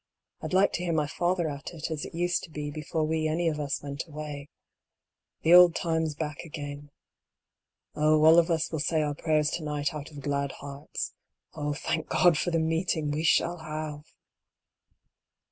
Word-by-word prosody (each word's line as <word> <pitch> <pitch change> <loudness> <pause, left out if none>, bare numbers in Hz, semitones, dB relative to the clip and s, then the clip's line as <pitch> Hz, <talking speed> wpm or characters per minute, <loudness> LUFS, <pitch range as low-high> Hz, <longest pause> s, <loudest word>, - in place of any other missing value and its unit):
I'd - - -5
like 190 +2 +4
to 175 - -2
hear 170 -2 0
my 155 -2 +2
father 175 +3 0
at 150 +3 -6
it, 160 0 -5
as 155 -2 -3
it - - -9
used 175 +1 +1
to - - -17
be 150 -1 -5
before 155 +2 -2
we 155 0 0
any 165 +2 0
of 155 -2 0
us 145 -1 -2
went 140 +3 -5
away 150 -2 -7 0.4
— - - -62
■ - - -41
the 165 - +5
old 180 -1 +9
times 160 -3 0
back 150 -1 -4
again. 145 -3 -7 1.0
Oh, 155 0 +3
all 160 +2 +8
of 170 +1 +2
us 160 -2 0
will 160 - -2
say 155 +2 +1
our 145 -1 -1
prayers 150 0 +1
to 165 - -3
night 150 +1 -2
out 150 -1 -6
of 145 -2 -10
glad 140 -1 -1
hearts. 140 +1 -6 0.4
Oh, 150 -1 -2
thank 160 +2 -2
God 175 -3 +5
for 175 - 0
the 165 - +1
meeting 160 -1 0
we 150 +2 -1
shall 170 +1 +3
have 155 -1 -5
155 Hz, 195 wpm, -28 LUFS, 145-165 Hz, 1.0 s, old